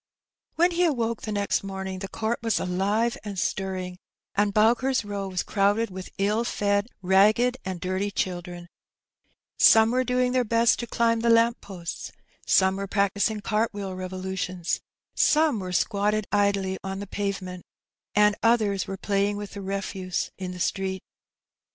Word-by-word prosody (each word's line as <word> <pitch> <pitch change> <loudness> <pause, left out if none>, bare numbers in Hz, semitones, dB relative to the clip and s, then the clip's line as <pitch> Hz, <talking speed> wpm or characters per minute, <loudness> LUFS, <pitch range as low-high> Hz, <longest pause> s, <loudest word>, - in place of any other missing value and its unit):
When 350 +2 +3
he 350 +1 +1
awoke 235 -8 0
the 215 - -5
next 205 -1 0
morning 190 -1 -5
the 195 - -5
court 220 +4 -2
was 225 -2 0
aEve 200 +6 0
and 205 -2 -6
stirrings 185 -1 -2 0.4
and 205 0 +2
Bowker's 235 +4 +2
Row 200 -1 -4
was 185 -2 -2
crowded 205 +2 +1
with 185 0 -7
ill 210 +4 +1
fed, 205 -2 0 0.2
ragged, 215 +7 +4
and 185 -2 -4
dirty 185 +3 -1
children: 175 -2 -4 0.9
some 225 0 +7
were 255 +1 +2
doing 250 0 +1
their 255 0 +2
best 230 0 +3
to 240 - -4
climb 230 -1 +1
the 235 +1 +1
lamp 230 +1 +4
posts, 175 -4 -7 0.4
some 190 0 +4
were 200 0 -4
practising 200 +2 0
cart 215 +1 0
wheel 200 -2 -4
revo 185 0 -6
lutions, 185 -2 -2 0.3
some 305 -6 +3
were 185 -1 -5
squatted 205 +3 +1
idly 200 -2 +1
on 190 0 -4
the 200 - -5
pavement^ 195 -2 -4 0.5
and 210 0 +5
others 215 -4 +2
were 195 - -5
playing 200 +1 0
with 205 -1 -6
the 200 - -7
refuse 190 -1 -3
in 185 -1 -4
the 180 - -8
street. 190 +1 -2
200 Hz, 160 wpm, -26 LUFS, 190-225 Hz, 0.9 s, some